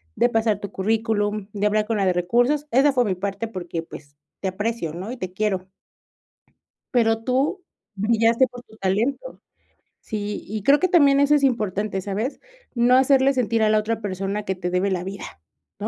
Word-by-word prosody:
de 240 - +3
pasar 225 -3 +1
tu 200 - -7
currículum, 210 0 -1
de 205 0 -1
hablar 210 0 +1
con 225 -1 0
la 195 - +1
de 185 - +3
recursos. 245 +12 +1
Esa 275 +4 +4
fue 250 -2 +3
mi 195 -3 0
parte 200 +4 -4
porque, 175 -5 -5
pues, 145 -3 -12 0.3
te 190 - -1
aprecio, 205 -4 -3
¿no? 185 +7 -6
Y 255 - -6
te 185 -4 -6
quiero" 190 -2 -1 1.3
"pero 225 -2 +2
tú, 275 - 0 0.4
brillaste 230 +4 +3
por 245 -1 -12
tu 220 -2 -19
talento". 225 - -2 0.6
Sí, 205 -1 -4
y 215 0 -5
creo 280 +6 +5
que 370 - +2
también 285 -6 +5
eso 285 +1 +4
es 285 - +1
importante, 210 -6 0
¿sabes? 210 +8 -3 0.3
No 245 +1 +4
hacerle 270 +1 +4
sentir 230 -3 +1
a 215 - +3
la 215 0 +4
otra 225 +1 -2
persona 195 +1 -3
que 190 - -2
te 180 -1 -4
debe 180 +2 0
la 180 -1 -2
vida, 195 +1 -6 0.6
¿no? - - -3
215 Hz, 190 wpm, -23 LUFS, 195-245 Hz, 1.3 s, creo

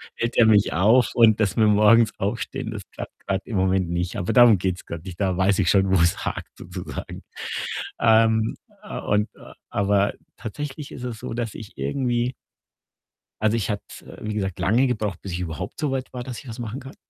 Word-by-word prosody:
hält 120 0 -2
er 115 - +7
mich 105 -2 +4
auf 110 +8 +4
und 115 -2 +6
dass 100 -3 +1
wir 110 -2 +5
morgens 105 +2 +5
aufstehen, 115 +4 -3
das 105 -3 -5
klappt - - -8
grad 100 -1 0
im 110 - -3
Moment 95 -1 +2
nicht. 90 +4 -2
Aber 90 - -1
darum 120 -4 +7
geht's 90 0 -2
grad 85 0 -7
nicht. 90 -2 -8
Da 95 -2 +1
weiß 95 +2 +3
ich 90 - +2
schon, 95 -1 +4
wo 95 - +4
es 85 +1 +1
hakt, - - -5
sozusagen. - - -7 0.8
Ähm, 110 0 +4 0.3
äh, - - -6
und 105 +1 +1
äh, - - -14 0.2
aber 100 0 +2 0.2
tatsächlich 145 +5 -6
ist 125 - -8
es 120 -3 -5
so, - - -5
dass 115 -2 -3
ich 110 -2 -10
irgendwie 125 -2 0 1.1
also, 110 +1 +2
ich 105 - -2
hatte 105 -1 -2
es, - - -11
äh, - - -12
wie 105 0 -3
gesagt, 95 -3 -3
lange 120 +7 +3
gebraucht, 105 -7 -2
bis 95 - -6
ich 85 - -3
überhaupt 90 +2 -5
so 150 -3 0
weit 130 -1 -3
war, 125 -1 -4
dass 125 -2 -6
ich 140 - -13
was 115 +1 -7
machen 120 +2 -4
kann 135 0 -11
110 Hz, 210 wpm, -24 LUFS, 95-120 Hz, 1.1 s, er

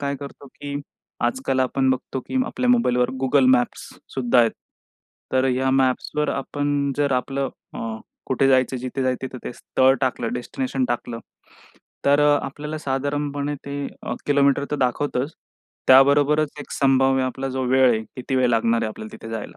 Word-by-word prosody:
काय 140 0 -2
करतो, 140 0 -9
की 140 +2 -8 0.5
आजकाल 130 +2 0
आपण 130 +1 +1
बघतो, 130 0 -2
की 260 - -5
आपल्या 250 - -2
मोबाईलवर 125 - +3
Google 130 0 +4
मॅप्स 125 -1 0 0.3
सुद्धा 125 -2 +2
आहेत. 115 -2 +5 0.8
तर 130 0 +3
या 130 +1 +1
मॅप्सवर 135 +3 +1
आपण 145 0 -1
जर 145 -2 +1
आपलं 135 +1 -1 0.3
अ, - - -6 0.5
कुठे 135 +1 +2
जायचं, 130 0 +3
जिथे 130 +2 -4
जायचं, 130 0 -1
तिथं 130 0 -8
ते - - -4
स्थळ 130 +2 +2
टाकलं, 120 -3 -1
डेस्टिनेशन 130 +1 -2
टाकलं, 120 -1 -3 0.9
तर 145 +1 +4 0.2
आपल्याला 150 +3 -5
साधारणपणे 145 +1 -2
ते 140 0 -4 0.4
किलोमीटर 140 -1 +3
तर 150 - 0
दाखवतंच 135 +2 -1 0.6
त्याबरोबरच 145 +3 +5
एक - - -10
संभाव्य 135 -1 +3
आपला 130 +1 -3
जो 130 0 -3
वेळ 130 0 +5
आहे, 110 -2 +1 0.2
किती 130 +1 -4
वेळ 125 -1 +3
लागणार 115 0 +2
आहे 110 - 0
आपल्याला 110 0 -9
तिथे 115 - -10
जायला. 110 -2 -6
135 Hz, 155 wpm, -23 LUFS, 125-140 Hz, 0.9 s, आहेत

